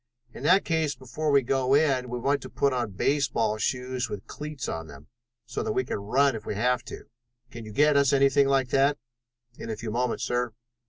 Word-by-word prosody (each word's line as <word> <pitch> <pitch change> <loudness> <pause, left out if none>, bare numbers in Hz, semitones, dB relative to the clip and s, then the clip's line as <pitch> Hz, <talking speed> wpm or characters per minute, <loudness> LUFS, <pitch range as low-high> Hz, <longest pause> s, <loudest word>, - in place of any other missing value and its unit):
"In - - -10
that 185 +7 +4
case 160 -3 0
before 130 +5 -4
we 140 -2 +4
go 135 +1 +2
in 135 -4 +2
we 125 - -3
want 140 +3 0
to - - -8
put 140 -1 +1
on 120 -3 -1
baseball 115 -2 0
shoes 125 +1 -2
with 105 -1 -6
cleats 150 -2 -6
on 80 0 -4
them, 70 0 -14 0.4
so - - -4
that - - -2
we 130 - +1
can - - -3
run 130 +6 +2
if 110 - -6
we - - -4
have 125 +3 +1
to. - - -8 0.5
Can 115 -1 -9
you 110 - -9
get 150 +6 +3
us 140 -2 +4
anything 140 0 +4
like 135 -2 +2
that?" 140 +2 +3 0.6
"In - - -7
a 110 - -3
few 110 0 -5
moments, 120 +1 -1
sir." 120 -2 -1
130 Hz, 215 wpm, -26 LUFS, 115-140 Hz, 0.6 s, that